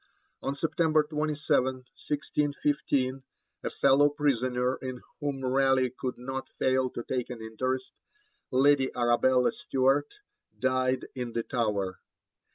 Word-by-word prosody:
On 135 - -2
September 155 0 +2
27, 150 -2 +1
1615, 135 +1 -1 0.4
a - - -1
fellow 140 +2 +4
prisoner 130 -3 0
in 130 -1 -6 0.2
whom 140 -3 -3
Raleigh 130 -1 +3
could 130 -1 -4
not 135 +2 -5
fail 130 0 +2
to 120 - -6
take 125 -1 -2
an 125 -2 -6
interest, 130 +4 -3 0.6
Lady 135 +1 +4
Arabella 125 +1 +3
Stuart, 135 +2 +1 0.5
died 130 0 +1
in 125 -2 -5
the 115 - -1
Tower. 105 -7 -1
130 Hz, 115 wpm, -29 LUFS, 125-140 Hz, 0.6 s, fellow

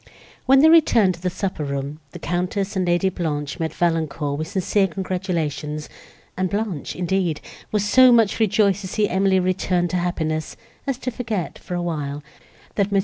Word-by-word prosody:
When 270 +1 +6
they 315 - +7
returned 235 - +5
to 170 - -13
the 180 - 0
supper 185 -3 -3
room, 140 +1 -4
the 175 - -9
Countess 180 +4 -2
and 185 -2 0
Lady 175 +2 +2
Blanche 150 -4 -3
met 160 -2 -1
Valancourt 160 -4 -1
with 155 - -3
sincere 195 +2 +1
congratulations; 165 -5 -3 0.5
and 185 0 -1
Blanche, 200 -6 -3
indeed, 180 -3 0 0.3
was 210 -1 +1
so 255 +4 +7
much 230 -3 +4
rejoiced 205 -2 +3
to 190 - -6
see 210 +2 0
Emily 190 0 +2
returned 180 -1 0
to 180 - 0
happiness, 160 -3 -2 0.3
as 270 -3 0
to 255 - -4
forget, 225 -7 -4
for 180 - -6
a 175 - -2
while, 145 -4 -3 0.5
that 200 -1 0
Mons. 200 - +3
180 Hz, 175 wpm, -22 LUFS, 160-200 Hz, 0.5 s, they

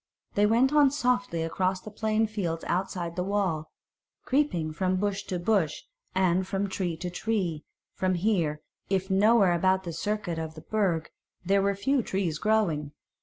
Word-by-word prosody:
They 205 +1 +3
went 245 +6 +3
on 295 -2 +6
softly 250 - 0
across 185 +3 0
the 215 - -10
plain 220 +1 +1
fields 185 -7 -3
outside 175 -1 -2
the 180 - -1
wall, 185 -6 -1 0.6
creeping 180 - +1
from 185 +3 0
bush 200 +1 -1
to 185 - -3
bush, 175 -3 0 0.3
and 185 0 +2
from 195 +1 -1
tree 180 -4 -2
to 180 +2 -4
tree, 180 -6 -1 0.3
for 185 0 0
here, 170 -5 0 0.3
if 190 0 0
nowhere 200 -1 +5
about 185 +2 +2
the 170 -2 -5
circuit 180 -1 -2
of 160 -1 -5
the 155 - -9
Burg, 185 -7 -1 0.4
were 200 0 +3
a 200 - -1
few 260 +7 +1
trees 185 -7 -2
growing. 170 -10 +1
190 Hz, 165 wpm, -28 LUFS, 170-215 Hz, 0.6 s, on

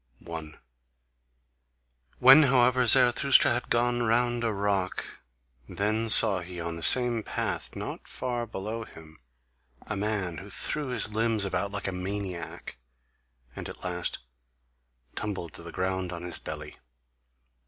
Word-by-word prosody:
1. 80 -2 -9 1.6
When 135 +4 +8
however 125 -2 +3
Zarathustra 120 +4 +5
had 120 - -3
gone 120 +1 +1
round 120 +1 +1
a 115 - +1
rock, 100 -2 -2 0.5
then 110 +3 -1
saw 105 -3 +6
he 90 0 -8
on 85 0 -4
the 85 - -7
same 120 +4 +5
path, - - -4
not - - -7
far 120 -2 -4
below 110 +2 -5
him, 80 -6 -15 0.7
a 110 - -4
man 100 -5 -2
who 100 - -11
threw 145 +8 -2
his 120 -4 +1
limbs 110 -2 +1
about 100 +1 -2
like 100 0 -3
a - - -1
maniac, 90 -7 -6 0.8
and - - -7
at - - -11
last 90 -1 -3 1.0
tumbled 95 -6 -5
to - - -9
the 85 0 -9
ground 95 +1 -2
on 85 -1 -7
his 90 -1 -2
belly. 75 -1 -7
100 Hz, 135 wpm, -27 LUFS, 90-120 Hz, 1.6 s, When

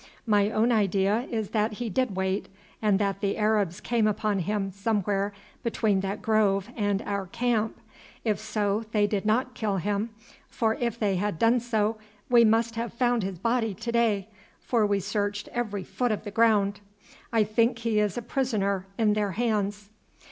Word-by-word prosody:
My 205 -2 +3
own 225 +3 +2
idea 205 +2 +2
is 220 -3 -3
that 215 0 +1
he 240 +3 -4
did 225 0 0
wait, 190 +1 -1 0.3
and 210 -3 +3
that 200 -1 -1
the 200 -1 0
Arabs 210 -4 +1
came 230 -3 +1
upon 210 -1 0
him 195 +1 -1
somewhere 200 0 0 0.3
between 220 -4 +1
that 195 +2 -3
grove 210 -1 +2
and 205 -2 0
our 200 -2 -3
camp; 225 +1 -1 0.4
if 215 -3 0
so, 215 0 -1
they 210 -1 +4
did 205 0 -1
not 250 +4 +1
kill 210 -4 -1
him, 205 +4 -1 0.4
for 225 -2 +1
if 235 -1 -2
they 200 -4 +1
had 205 -2 -1
done 230 +6 +4
so 220 -2 0 0.3
we 240 -1 +7
must 230 +1 +3
have 230 +1 -2
found 240 -1 +1
his 190 -2 -4
body 225 +1 0
to 230 +3 -4
day, 220 -4 +1 0.3
for 225 -4 +1
we 200 -1 +1
searched 205 +1 -2
every 215 -5 -3
foot 245 +6 -1
of 215 - -2
the 205 - -6
ground. 205 -2 +3 0.5
I 225 -2 +4
think 230 +3 +2
that 230 - -12
he 225 -2 +2
is 210 -1 0
a 240 - -3
prisoner 200 -8 -1
in 215 -2 +3
their 205 -2 0
hands." 210 -2 -1
210 Hz, 180 wpm, -27 LUFS, 200-230 Hz, 0.5 s, we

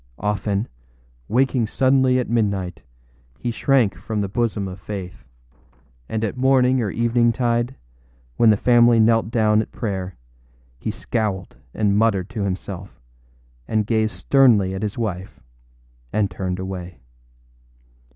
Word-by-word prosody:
Often, 105 +1 -1 0.6
waking 125 -1 +1
suddenly 130 +1 +3
at 125 - -1
midnight, 100 -7 -1 0.6
he 120 - -3
shrank 120 -4 +2
from 105 +4 -4
the 100 - -1
bosom 105 -1 -1
of 95 0 -8
Faith; 95 -3 -7 0.9
and 110 0 -2
at 110 - -2
morning 130 0 +3
or 105 - -1
eventide, 120 +2 +1 0.6
when 115 - +5
the 105 - +5
family 120 0 +5
knelt 115 0 +3
down 110 -2 +3
at - - -7
prayer, 95 -4 -4 0.6
he - - -4
scowled 100 -5 -3 0.2
and 105 -1 +2
muttered 105 -3 +1
to 115 -4 -4
himself, 95 -1 -5 0.7
and 110 -1 0
gazed 110 0 0
sternly 115 -9 +3
at 95 - -4
his 105 -1 -3
wife, 95 -5 -4 0.7
and 105 -1 0
turned 90 -2 -3
away. 90 -2 -6
110 Hz, 130 wpm, -22 LUFS, 100-120 Hz, 0.9 s, when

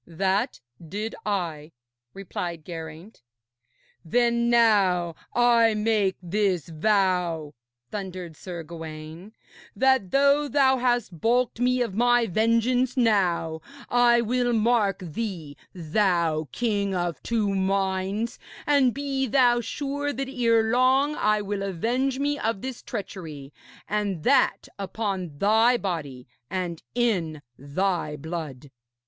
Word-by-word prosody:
'That 195 +7 -1 0.3
did 215 +5 -4
I,' 165 -6 -3 0.4
replied 175 -4 -5
Geraint. 165 +4 -9 0.8
'Then 235 +5 +2
now 200 -7 +3 0.2
I 235 -2 +4
make 210 -3 +1
this 185 -3 0
vow,' 175 -3 0 0.4
thundered 185 -5 -6
Sir 175 0 -7
Gawaine, 160 +3 -9 0.4
'that 265 -7 +3
though 280 +4 +3
thou 270 -2 +3
hast 240 -9 -1
balked 240 0 +1
me 250 0 +2
of 230 - -5
my 240 +2 +3
vengeance 230 +5 +1
now, 180 -9 +1 0.3
I 240 -1 +5
will 245 +1 0
mark 215 -4 +2
thee, 165 -5 -5 0.2
thou 170 -3 0
king 205 -5 -1
of 175 -2 -2
two 215 -4 0
minds, 195 +3 -1 0.3
and 280 -4 +3
be 275 -1 -1
thou 240 -1 +4
sure 285 +4 -3
that 270 +2 -3
erelong 250 +3 +3
I 215 -6 +1
will 200 0 -3
avenge 235 +8 -1
me 290 +1 -1
of 220 -3 -2
this 260 -2 -5
treachery, 165 - -7 0.3
and 200 -6 -2
that 275 - +3
upon 195 -6 -3
thy 225 +7 +4
body 150 - -5 0.2
and 180 -3 -3
in 175 -11 0
thy 155 +3 -2
blood.' 150 -3 -7
205 Hz, 115 wpm, -25 LUFS, 175-240 Hz, 0.8 s, I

